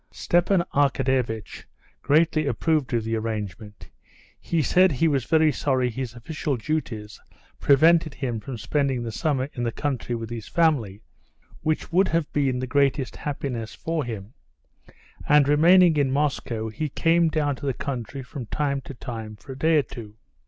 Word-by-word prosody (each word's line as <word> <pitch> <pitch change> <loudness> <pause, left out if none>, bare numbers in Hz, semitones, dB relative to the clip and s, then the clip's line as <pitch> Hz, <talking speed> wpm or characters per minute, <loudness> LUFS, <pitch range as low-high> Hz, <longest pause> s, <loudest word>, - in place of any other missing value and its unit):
Stepan 175 +1 +1
Arkadyevitch 130 -5 0 0.4
greatly 155 +1 +2
approved 145 +2 0
of 115 -2 0
the 115 +1 -2
arrangement. 105 -2 -5 0.5
He 165 -2 0
said 185 +6 +4
he 150 +5 +2
was 140 -5 0
very 160 -1 +4
sorry 130 -4 0
his 125 0 -5
official 145 +2 -3
duties 110 -6 -4 0.4
prevented 155 +1 +4
him 120 -4 -3
from 130 +2 -7
spending 130 +3 -1
the 115 - -4
summer 135 +1 -1
in 120 - -5
the 120 -1 0
country 125 -3 -3
with 115 0 -6
his 115 -3 -6
family, 125 - +1 0.6
which 155 +1 -1
would 185 +3 +4
have 165 -3 -1
been 135 -3 +1
the 130 - -2
greatest 135 0 +1
happiness 130 -6 -4
for 165 -2 -2
him; 110 -2 -7 1.0
and 145 -1 +6
remaining 170 +3 +6
in 140 -2 +2
Moscow, 130 -5 -1
he 150 +8 -3
came 165 +3 +2
down 150 -3 0
to 140 - -6
the - - +2
country 130 0 -5
from 125 -2 -8
time 140 0 -1
to 135 - -10
time 115 -3 -7
for 135 +6 -12
a - - -6
day 160 +4 +3
or 145 - +3
two. 110 -5 -10
135 Hz, 165 wpm, -24 LUFS, 115-155 Hz, 1.0 s, and